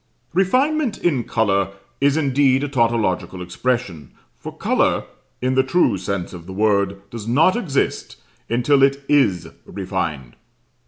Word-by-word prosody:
"Refinement 255 - +1
in 145 -9 0
colour" 100 -3 0 0.3
is 140 +2 +2
indeed 135 -2 +2
a - - -1
tautological 115 -8 0
expression, 90 - -3 0.2
for - - -8
colour, - - +1 0.4
in 130 +1 +1
the 130 - +4
true 135 - +2
sense 95 -1 -4
of 85 -1 -10
the 95 - -7
word, 100 -1 0
does 115 -2 -7
not 155 +10 +4
exist 170 - -2 0.3
until 125 +4 +2
it 140 +1 +2
is 95 - +2
refined. 85 -10 -4
120 Hz, 130 wpm, -20 LUFS, 95-140 Hz, 0.4 s, the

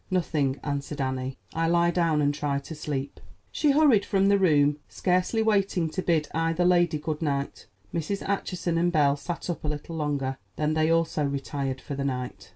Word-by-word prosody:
"Nothing," 150 -7 0
answered 145 +1 -3
Annie. 130 0 -2 0.2
"I 165 0 0
lie 170 +1 +3
down 165 -4 +2
and 145 0 +2
try 145 -1 -1
to 140 +4 -7
sleep." 145 -2 -4 0.3
She 300 - +1
hurried 275 -8 +5
from 195 -1 +2
the 200 0 +4
room, 150 -5 +3
scarcely 185 +5 +1
waiting 195 -6 +1
to 185 - -2
bid 160 -4 +1
either 165 +2 +1
lady 175 -3 +3
good 150 +1 -4
night. 140 -3 -2 0.3
Mrs. 170 +5 -3
Acheson 180 -3 -1
and 175 +1 +2
Belle 145 -4 +3
sat 165 +4 -5
up 175 -4 -4
a - - -2
little 150 +2 -4
longer, 140 -4 -2 0.2
then 155 0 0
they 155 0 +2
also 165 -2 +1
retired 140 -1 -2
for 140 - -7
the 140 0 -3
night. 125 -2 -4
155 Hz, 185 wpm, -26 LUFS, 140-175 Hz, 0.3 s, hurried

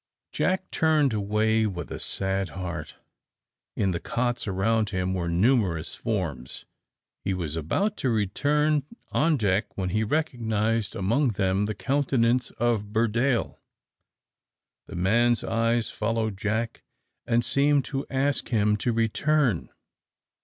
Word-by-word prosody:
Jack 185 0 -1
turned 155 -5 +2
away 110 +2 +1
with 90 -4 -6
a - - -5
sad 95 0 -1
heart. 85 -4 -5 0.8
In 95 -2 +1
the 85 - -2
cots 120 +4 -2
around 105 +3 +1
were 90 -2 -1
numerous 90 -3 +1
forms. 85 - -4 0.6
He 95 - -1
was 80 -4 -2
about 195 - -1
to 130 - 0
return 145 +8 +1 0.3
on 155 0 +2
deck, 100 -2 0
when 95 -2 -1
he 110 +4 0
recognised 115 -5 -1
among 115 +7 +1
them 95 +1 +1
the 105 - -3
countenance 130 -1 +1
of 115 -4 0
Burdale. 115 +3 +1 1.3
The - - -9
man's 115 +7 +2
eyes 115 0 0
followed 110 -1 -1
Jack, 110 +3 -2 0.5
and 120 -1 +2
seemed 140 +3 +3
to 135 -1 -4
ask 140 +1 0
him 105 -2 +2
to 120 +4 0
return. 115 - +1
110 Hz, 125 wpm, -26 LUFS, 95-125 Hz, 1.3 s, seemed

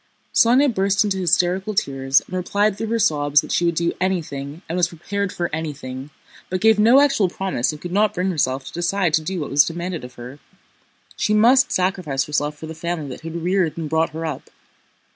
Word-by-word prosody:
Sónya 250 +3 +4
burst 195 0 +2
into 200 -2 -1
hysterical 185 +3 +1
tears 135 -6 +1
and 185 - -7
replied 200 +3 0
through 225 - -4
her 230 +1 0
sobs 145 -7 +3
that - - -9
she 175 - +1
would 170 -1 +1
do 170 +1 0
anything 160 -4 -3
and 165 - -4
was 180 -1 +2
prepared 200 +4 -4
for 175 - -2
anything, 140 -4 -5 0.4
but 185 - -2
gave 220 +1 +4
no 235 +6 +6
actual 275 -10 +3
promise 180 -9 -1
and 150 - -9
could 175 +2 -7
not 210 +2 +2
bring 185 +1 0
herself 135 -5 -1
to - - -10
decide 175 0 0
to 160 - +3
do 175 +2 -4
what 145 - -5
was 140 +1 +6
demanded 170 0 -4
of 125 0 -10
her. 125 +4 -10 0.8
She 210 - 0
must 250 +5 +5
sacrifice 180 -7 0
herself 150 0 -2
for 160 - -8
the 160 - -7
family 160 -2 -4
that 130 - -8
had 165 +1 -6
reared 180 -3 0
and 160 -2 -3
brought 160 +1 +1
her 160 +1 -6
up. 155 -4 -6
175 Hz, 210 wpm, -21 LUFS, 150-195 Hz, 0.8 s, no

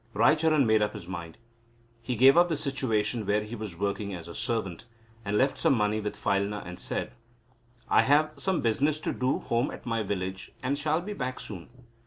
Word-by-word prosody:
Raicharan 150 +5 +4
made 110 -1 +4
up 105 - 0
his 100 -6 -9
mind. 85 -3 -7 0.6
He 125 +1 -3
gave 130 +5 +7
up 175 +1 +5
the 160 - 0
situation 125 -6 -1
where 105 +1 +2
he 110 +3 -7
was 105 -6 -7
working 100 0 -2
as 85 -1 -9
a 85 - -8
servant, 115 -5 -3 0.4
and 105 0 0
left 135 +3 +2
some - - +3
money 105 -1 +1
with 105 -1 -4
Phailna 100 +1 0
and 90 0 -8
said: - - -3 0.8
"I - - +5
have 150 +3 +3
some 185 +6 -1
business 140 +7 +1
to - - -3
do 130 +1 0
at - - -11
home 120 +3 0
in - - -7
my 115 -2 0
village, 95 -2 -4
and 135 +2 +1
shall 155 +3 0
be 205 +4 -5
back 130 -7 -4
soon." 95 -6 -8
115 Hz, 205 wpm, -28 LUFS, 100-140 Hz, 0.8 s, gave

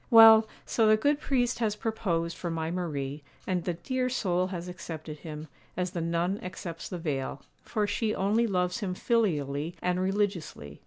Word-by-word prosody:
Well, 225 -2 +9 0.2
so 225 -2 +2
the 215 0 +6
good 285 +6 +2
priest 250 -5 +1
has 215 -3 +1
proposed 180 -7 -1
for 175 - -4
my 165 0 -2
Marie, 150 -5 -3 0.2
and 180 -2 0
the 175 -1 -1
dear 255 +9 -1
soul 185 -7 +1
has 180 -2 -5
accepted 160 -3 -7
him, 155 0 -7 0.3
as 180 -1 -1
the 170 - -3
nun 170 +4 0
accepts 170 -2 -6
the 180 - -4
veil; 140 -4 -3 0.2
for 210 -1 -1
she 215 +2 0
only 215 +5 +2
loves 180 -1 0
him 190 -4 -2
filially 160 - 0
and 180 +1 0
religiously. 185 - -2
180 Hz, 170 wpm, -29 LUFS, 165-215 Hz, 0.3 s, Well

